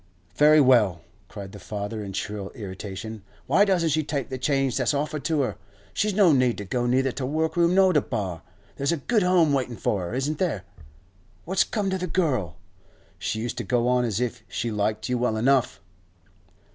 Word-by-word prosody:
'Very 150 +5 +6
well,' 115 - +4 0.2
cried 100 -1 -9
the 105 - -10
father 105 +1 -5
in 100 - -6
shrill 100 0 -4
irritation, 100 0 -7 0.2
'why 200 - +4
doesn't 180 -5 +2
she 155 +2 +1
take 140 -3 -3
the 130 - -4
change 135 -1 +1
that's 130 +1 +1
offered 150 +1 -2
to 155 -3 +1
her? 110 -7 -2 0.4
She's 210 -2 0
no 195 -5 +6
need 130 -4 +2
to 105 - -6
go 120 +5 -1
neither 130 +2 +2
to 135 - -5
workroom 160 +5 +1
nor 190 -1 +5
to 150 - +4
bar. 95 - -4 0.4
There's 140 +2 0
a 170 - 0
good 215 - +1
home 180 -5 +3
waiting 125 -4 -1
for 100 - -1
her, 90 +6 -4
isn't 145 +4 -2
there? 155 - -1 0.8
What's 190 +2 +2
come 200 -3 -2
to 190 - -1
the 180 - -3
girl? 135 - -1 0.6
She 110 - -2
used 120 +1 -4
to - - -2
go 120 -1 +1
on 125 0 +3
as 110 -3 -1
if 125 -2 -2
she 115 - -3
liked 105 0 -1
you 125 -1 -1
well 120 -3 0
enough. 130 +1 +2
130 Hz, 195 wpm, -25 LUFS, 110-155 Hz, 0.8 s, Very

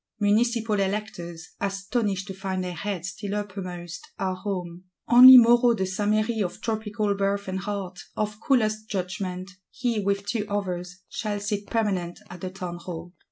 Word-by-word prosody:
Municipal 220 +1 +2
Electors, 190 -4 -3
astonished 195 0 -1
to 195 - -6
find 190 -1 -3
their 180 -1 -4
heads 185 0 -3
still 205 0 -5
uppermost, 185 - -6
are 190 -1 -1
home: 185 -2 -5 0.2
only 255 +2 +11
Moreau 240 0 +6
de 190 -3 -1
Saint 205 +2 -1
Méry 215 +1 +1
of 180 - -5
tropical 215 -2 -1
birth 200 0 -1
and 190 0 -2
heart, 195 -2 -4 0.2
of 210 0 -2
coolest 215 -4 +1
judgment; 185 -1 -3 0.2
he, 240 -3 -1
with 200 0 0
two 210 0 -2
others, 180 -2 -3
shall 210 -2 -3
sit 205 0 -3
permanent 190 -7 -1
at 180 -1 -9
the 185 - -3
Townhall. 175 -2 -7
200 Hz, 155 wpm, -26 LUFS, 185-215 Hz, 0.2 s, only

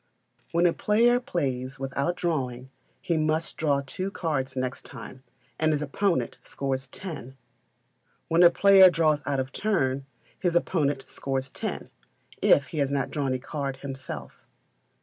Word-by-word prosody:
When 170 +1 +3
a 170 - +4
player 235 +4 +3
plays 135 - -3
without 140 +5 -1
drawing, 130 -7 -2 0.3
he 170 - 0
must 155 +1 0
draw 140 -3 +1
two 185 +8 -3
cards 140 -8 -2
next 130 0 -3
time, 130 +1 -10 0.4
and 155 0 +3
his 150 0 0
opponent 150 - 0
scores 135 -1 -3
ten. 135 - -8 0.9
When 165 +2 +3
a 175 - +9
player 190 +1 +7
draws 155 -3 +2
out 140 -2 0
of 130 0 -3
turn, 135 -11 0 0.3
his 175 -2 0
opponent 145 -6 +1
scores 135 0 -3
ten, - - -5 0.5
if 140 -2 +4
he 155 - -4
has 140 -1 +1
not 140 -2 -1
drawn 140 -3 -1
a - - 0
card 135 +1 -4
himself. 135 -1 -7
140 Hz, 150 wpm, -27 LUFS, 130-170 Hz, 0.9 s, a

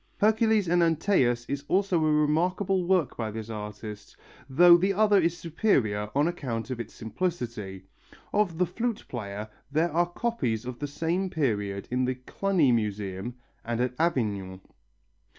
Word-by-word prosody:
Hercules 220 -1 +3
and 175 +1 +3
Antæus 155 -8 +2
is 140 0 -3
also 185 -4 +2
a 155 - +3
remarkable 180 +5 +1
work 180 -8 +2
by 110 -2 -3
this 110 +1 -6
artist, 105 -1 -8 0.3
though 170 +6 +8
the 190 +3 +2
other 205 -1 +4
is 170 +1 0
superior 130 - 0
on 145 +3 +3
account 130 -8 -4
of 125 - -4
its 115 -2 -6
simplicity. 110 - -4 0.5
Of 205 -6 +1
the 180 - +3
Flute 225 +6 -3
Player 105 -3 -5 0.2
there 160 +4 +1
are 175 +2 +1
copies 175 - -2
of 125 -1 -6
the 145 - -3
same 170 +6 -1
period 105 - -1
in 125 +1 +1
the 130 0 -1
Cluny 155 +3 +1
Museum 105 0 -2 0.3
and 120 0 -2
at 125 0 0
Avignon. 100 - -1
145 Hz, 150 wpm, -27 LUFS, 110-180 Hz, 0.5 s, though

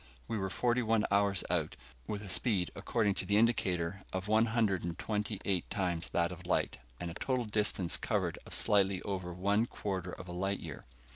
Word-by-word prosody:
We 115 - -2
were 95 0 -1
forty 120 +5 +1
one 110 -2 +2
hours 100 -1 +3
out, - - 0 0.3
with 105 0 -3
a 100 - -8
speed, 90 -1 +1
according 100 +1 +1
to - - -5
the 100 - +4
indicator, 100 -5 +2
of 95 +1 -3
one 110 +2 +4
hundred 110 -5 +1
and 85 -1 -3
twenty 105 -1 -2
eight 95 -4 +1
times 90 -3 -1
that 85 +1 +1
of 90 0 -9
light, 90 - +1 0.2
and 85 -1 -3
a - - -7
total 130 +5 -1
distance 105 -4 +2
covered - - -1
of - - -5
slightly 100 -2 +3
over 95 -3 -3
one 100 +6 +1
quarter 95 -5 -3
of 90 - -8
a - - -6
light 95 +3 -1
year. 80 -4 -8
100 Hz, 200 wpm, -33 LUFS, 90-105 Hz, 0.3 s, the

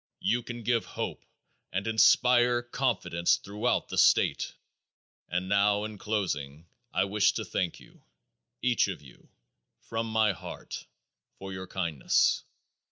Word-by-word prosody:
You 120 +1 +1
can 120 0 -7
give 115 0 +1
hope - - -5 0.5
and 95 +2 -2
inspire 120 +2 +4
confidence 120 -9 +1
throughout 105 +2 -1
the - - -1
state. - - +3 0.7
And 90 +1 -1
now 100 +1 +3
in 105 -1 -6
closing, 80 -9 -3 0.3
I - - +2
wish 100 +1 +2
to - - -3
thank 90 -3 -2
you, - - -19 0.6
each 125 -4 +3
of 95 -6 -6
you, 65 - -17 0.5
from 115 0 -3
my 110 -1 +3
heart, 90 - -8 0.5
for 95 0 -7
your 95 0 -6
kindness. 85 -8 +1
105 Hz, 130 wpm, -29 LUFS, 95-115 Hz, 0.7 s, inspire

